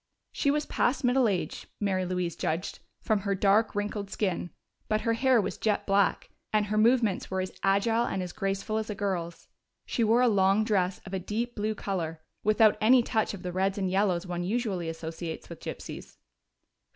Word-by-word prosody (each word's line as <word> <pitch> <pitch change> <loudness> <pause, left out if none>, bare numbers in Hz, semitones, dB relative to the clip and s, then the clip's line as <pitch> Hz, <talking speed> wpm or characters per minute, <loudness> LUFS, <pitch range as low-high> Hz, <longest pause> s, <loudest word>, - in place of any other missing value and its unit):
She 280 - 0
was 295 +1 +1
past 260 +3 0
middle 250 0 +4
age, 190 -4 -2
Mary 190 -3 0
Louise 180 -2 -2
judged, 165 +3 -3 0.2
from 215 -2 +2
her 200 0 -1
dark, 205 +3 +3
wrinkled 205 -1 -3
skin, 190 -4 -2 0.4
but 215 0 +1
her 230 - +1
hair 255 +1 +3
was 205 - -2
jet 215 -2 0
black, 200 0 +1 0.2
and 215 -1 +2
her 210 +1 -2
movements 225 -3 +3
were 190 - -1
as 185 0 -2
agile 225 +4 +2
and 190 - -2
as 180 - -6
graceful 195 +2 -2
as 220 - -5
a 210 - -3
girl's. 180 -4 -3 0.4
She 235 - 0
wore 230 +3 +4
a - - +5
long 200 -1 +3
dress 195 -4 0
of 190 - -9
a 190 - 0
deep 225 +6 -3
blue 215 +1 -1
color, 170 -6 -3 0.2
without 215 0 +4
any 245 +3 +6
touch 220 -3 0
of 190 - -11
the 180 - -3
reds 190 +2 0
and 190 -2 -1
yellows 190 -2 +1
one 175 -1 -3
usually 195 -4 -1
associates 165 0 -6
with - - -9
gypsies. - - -8
200 Hz, 190 wpm, -28 LUFS, 185-220 Hz, 0.4 s, any